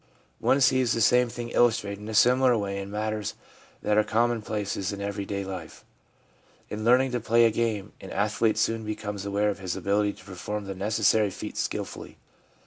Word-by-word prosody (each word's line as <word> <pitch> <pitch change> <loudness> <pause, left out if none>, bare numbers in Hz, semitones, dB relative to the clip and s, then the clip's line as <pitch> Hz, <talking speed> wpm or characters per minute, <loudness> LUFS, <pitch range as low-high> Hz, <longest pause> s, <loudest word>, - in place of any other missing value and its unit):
One 140 - +2
sees 130 -3 +4
the - - -1
same 125 +2 +4
thing 120 0 -6
illustrated 105 -5 +1
in 105 - -7
a 110 - -4
smaller 125 +2 +5
way 100 -1 -3
in 100 0 -6
matters 105 0 -3 0.5
that 105 0 +3
are - - +4
commonplaces 110 -4 -1
of 100 - -6
everyday 100 0 -3
life. 95 -4 -8 0.9
In 105 +1 -4
learning 125 +3 +4
to 125 - -1
play 115 +1 +4
a 115 - +4
game, 110 -3 -2
an 95 - -9
athlete 110 +1 +1
soon 115 +1 0
becomes 105 -2 -5
aware 100 +1 +1
of 100 - -7
his 90 -2 -3
ability 100 +2 +1
to - - -17
perform 105 +2 -5
the 95 - -4
necessary 105 +1 +2
feats - - -5
skilfully. - - -5
105 Hz, 180 wpm, -27 LUFS, 100-115 Hz, 0.9 s, smaller